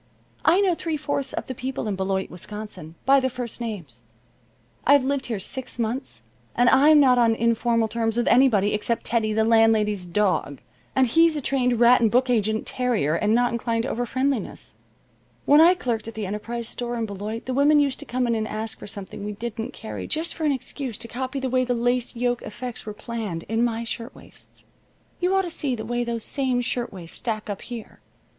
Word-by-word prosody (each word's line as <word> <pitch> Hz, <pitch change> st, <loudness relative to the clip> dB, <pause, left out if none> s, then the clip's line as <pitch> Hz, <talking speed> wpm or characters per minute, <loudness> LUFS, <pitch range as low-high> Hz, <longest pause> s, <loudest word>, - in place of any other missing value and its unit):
I 350 Hz, +5 st, +5 dB
know 380 Hz, -3 st, +3 dB
three 325 Hz, -2 st, -2 dB
fourths 285 Hz, -2 st, -2 dB
of -, -, -4 dB
the 260 Hz, -, -5 dB
people 255 Hz, -1 st, -4 dB
in 205 Hz, -, -1 dB
Beloit, 190 Hz, 0 st, -2 dB
Wisconsin, 180 Hz, -3 st, -8 dB
by 275 Hz, +2 st, +6 dB
their 260 Hz, 0 st, 0 dB
first 245 Hz, -1 st, -5 dB
names. 170 Hz, -, -6 dB, 0.8 s
I've 285 Hz, 0 st, +5 dB
lived 275 Hz, 0 st, -1 dB
here 230 Hz, -3 st, -2 dB
six 250 Hz, +7 st, -5 dB
months 240 Hz, +4 st, -3 dB, 0.3 s
and 245 Hz, +1 st, +5 dB
I'm 295 Hz, +3 st, +6 dB
not 255 Hz, -3 st, +5 dB
on 230 Hz, -1 st, +4 dB
informal 230 Hz, 0 st, +2 dB
terms 225 Hz, 0 st, -1 dB
with 240 Hz, -, +1 dB
anybody 220 Hz, -6 st, +4 dB
except 215 Hz, +2 st, -1 dB
Teddy, 225 Hz, -2 st, +1 dB
the 220 Hz, +1 st, +2 dB
landlady's 220 Hz, -4 st, +3 dB
dog, 180 Hz, -8 st, 0 dB, 0.4 s
and 265 Hz, -, +5 dB
he's 330 Hz, +6 st, +4 dB
a -, -, -1 dB
trained 250 Hz, -3 st, +1 dB
rat 240 Hz, +1 st, +6 dB
and 225 Hz, -, +4 dB
book 250 Hz, +3 st, +2 dB
agent 220 Hz, -1 st, +1 dB
terrier, 240 Hz, -, +1 dB
and 210 Hz, +6 st, +2 dB
not 245 Hz, 0 st, +2 dB
inclined 230 Hz, -1 st, -1 dB
to 265 Hz, -, -3 dB
overfriendliness. 255 Hz, +1 st, -2 dB, 0.7 s
When 295 Hz, +2 st, +7 dB
I 350 Hz, +3 st, +7 dB
clerked 235 Hz, -9 st, -2 dB
at 225 Hz, -, -7 dB
the 215 Hz, -2 st, -3 dB
Enterprise 225 Hz, +4 st, -4 dB
Store 240 Hz, 0 st, -4 dB
in 230 Hz, -1 st, -1 dB
Beloit 210 Hz, +2 st, -5 dB
the 255 Hz, -, -2 dB
women 285 Hz, +3 st, +4 dB
used 280 Hz, -2 st, +2 dB
to 290 Hz, -, -7 dB
come 250 Hz, -1 st, -1 dB
in 235 Hz, -, +1 dB
and 220 Hz, -1 st, -1 dB
ask 220 Hz, +1 st, -5 dB
for -, -, -9 dB
something 200 Hz, -1 st, -8 dB
we 210 Hz, 0 st, -4 dB
didn't 225 Hz, +1 st, -5 dB
carry 220 Hz, -, -7 dB
just 320 Hz, +2 st, -2 dB
for 320 Hz, -, -3 dB
an 295 Hz, -, +3 dB
excuse 260 Hz, -2 st, -4 dB
to -, -, -5 dB
copy 260 Hz, +4 st, -4 dB
the 265 Hz, -, -2 dB
way 255 Hz, 0 st, +2 dB
the 250 Hz, -1 st, 0 dB
lace 245 Hz, +1 st, 0 dB
yoke 245 Hz, 0 st, 0 dB
effects 240 Hz, +1 st, -7 dB
were 210 Hz, -, -4 dB
planned 215 Hz, -7 st, -5 dB
in 225 Hz, +2 st, 0 dB
my 230 Hz, -1 st, 0 dB
shirtwaists. 230 Hz, +2 st, -9 dB, 0.6 s
You 365 Hz, +2 st, +1 dB
ought 385 Hz, -, +3 dB
to 350 Hz, -, -5 dB
see 280 Hz, -6 st, -1 dB
the 220 Hz, -1 st, -6 dB
way 240 Hz, +1 st, -1 dB
those 235 Hz, -2 st, -3 dB
same 260 Hz, -3 st, 0 dB
shirtwaist 205 Hz, -9 st, -4 dB
stack 215 Hz, -3 st, -3 dB
up 200 Hz, -, -6 dB
here. 235 Hz, -3 st, -8 dB
235 Hz, 205 wpm, -24 LUFS, 220-260 Hz, 0.8 s, When